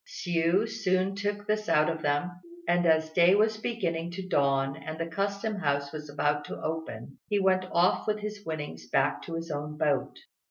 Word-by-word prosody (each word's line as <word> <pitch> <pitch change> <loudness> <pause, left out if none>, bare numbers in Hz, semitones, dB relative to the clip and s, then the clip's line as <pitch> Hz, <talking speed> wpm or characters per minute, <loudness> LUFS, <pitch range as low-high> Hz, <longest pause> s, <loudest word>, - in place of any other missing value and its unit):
Hsiu 175 +4 +1
soon 185 -2 0
took 205 +1 -3
this 215 0 -1
out 150 0 +4
of 160 -2 -2
them; 145 +4 0 0.4
and, 175 0 +3
as 160 0 +3
day 175 +3 +5
was 215 +1 +3
beginning 175 -8 -2
to 190 +1 -6
dawn 135 -4 +2
and 155 +2 -7
the 165 - -2
Custom 200 +5 -2
House 140 -5 0
was 150 -1 -7
about 145 0 0
to - - -6
open, 155 -6 -5
he 205 -1 +2
went 190 -1 +3
off 175 +5 +3
with 215 0 +1
his 210 0 -5
winnings 150 - -6
back - - +2
to 165 - -6
his 165 0 -4
own 150 +1 -4
boat. 145 -2 0
165 Hz, 190 wpm, -29 LUFS, 150-195 Hz, 0.4 s, day